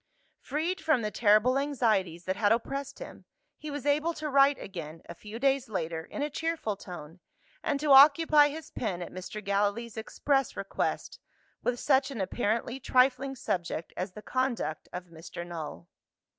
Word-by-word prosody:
Freed 320 +5 -2
from 310 -7 +2
the 210 - -2
terrible 225 +5 +4
anxieties 215 - 0
that 190 - -1
had 205 0 +2
oppressed 275 +4 -1
him, - - -10 0.3
he 305 - -8
was 290 -2 -5
able 305 +3 +2
to 305 -1 -4
write 275 0 +5
again, 165 -4 -8
a - - -7
few 210 +1 -9
days 270 0 +1
later, 165 -5 -3
in 290 - -4
a 295 - -1
cheerful 325 -9 -2
tone, 175 -3 -10 0.4
and 285 -2 -1
to 295 0 +1
occupy 295 +2 +8
his 310 +1 -8
pen 185 -7 -3
at - - -9
Mr. 185 +3 -7
Gallilee's 205 +3 0
express 270 +5 0
request, - - -3 0.4
with 245 -1 -1
such 270 -1 +3
an 265 -6 -6
apparently 230 +5 -1
trifling 260 +1 +2
subject 175 -8 -3
as 185 +1 -4
the 210 - -10
conduct 255 -12 -2
of 180 0 -6
Mr. 165 +1 -8
Null. 155 - -7
240 Hz, 165 wpm, -29 LUFS, 190-280 Hz, 0.4 s, occupy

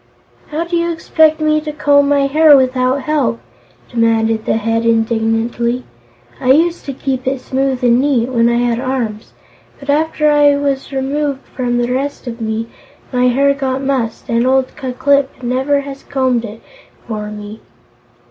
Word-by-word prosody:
"How 310 +2 -2
do 345 +1 -3
you 340 0 0
expect 315 -1 +2
me 305 0 +1
to 305 0 -5
comb 285 -1 +3
my 285 -1 +3
hair 300 +1 +6
without 255 +1 +1
help?" 270 -7 0 0.5
demanded 225 -2 +1
the - - +1
Head, 225 +1 -1
indignantly. 230 +2 0 0.6
"I 255 - +4
used 335 +4 +1
to 275 - -4
keep 260 -1 -3
it 265 0 0
smooth 265 0 -2
and 240 0 +4
neat, 260 -4 +1
when 235 -2 +2
I 235 - +1
had 240 -1 0
arms, 245 -5 -3 0.5
but 280 0 -2
after 305 0 +1
I 290 -1 +5
was 280 -1 -2
removed 275 +1 -2
from 245 -2 -1
the 240 +1 0
rest 280 +3 -3
of 235 -1 -7
me, 220 0 -2 0.5
my 250 0 +2
hair 280 +3 +3
got 270 -1 -3
mussed, 260 -5 -2
and 235 +2 +1
old 265 0 +1
Ku 265 -4 -5
Klip 280 0 +1
never 265 +4 0
has 275 -1 -9
combed 260 -4 -1
it 220 +1 -10 0.4
for 210 -2 -4
me." 210 +1 -9
260 Hz, 165 wpm, -16 LUFS, 235-285 Hz, 0.6 s, hair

